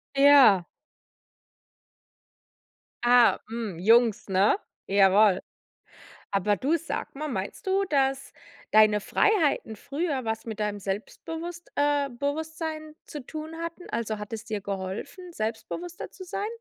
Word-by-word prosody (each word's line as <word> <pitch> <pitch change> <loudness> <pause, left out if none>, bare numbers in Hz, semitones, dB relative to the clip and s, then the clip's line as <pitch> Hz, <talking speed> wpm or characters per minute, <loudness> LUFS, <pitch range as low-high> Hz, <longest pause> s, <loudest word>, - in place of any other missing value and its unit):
Ja. 275 -10 +7 2.4
Ah, 245 -1 +6
hm, 225 -7 -5
Jungs, 225 +2 +3
ne? 195 - +3 0.3
Jawoll. 195 0 +5 0.9
Aber 200 +1 +2
du, 300 +9 +1
sage 320 -3 -5
mal, 305 +1 -3
meinst 195 - -5
du, 385 +1 +2
dass 270 -4 0 0.4
deine 215 -1 +6
Freiheiten 315 - +1
früher 285 - -3
was 220 0 -3
mit 220 -1 -6
deinem 210 -1 -2
Selbstbewusst 325 - -6
äh, 285 -1 +2
Bewusstsein 310 +3 -4
zu 290 -4 -8
tun 315 +1 -7
hatten? 335 +2 -7
Also, 220 -2 -3
hat 210 +2 -7
es 220 +1 -6
dir 215 -3 -4
geholfen, 200 - -6
selbstbewusster 280 +10 -5
zu 375 - -10
sein? 395 +4 -3
250 Hz, 120 wpm, -26 LUFS, 210-315 Hz, 2.4 s, Ja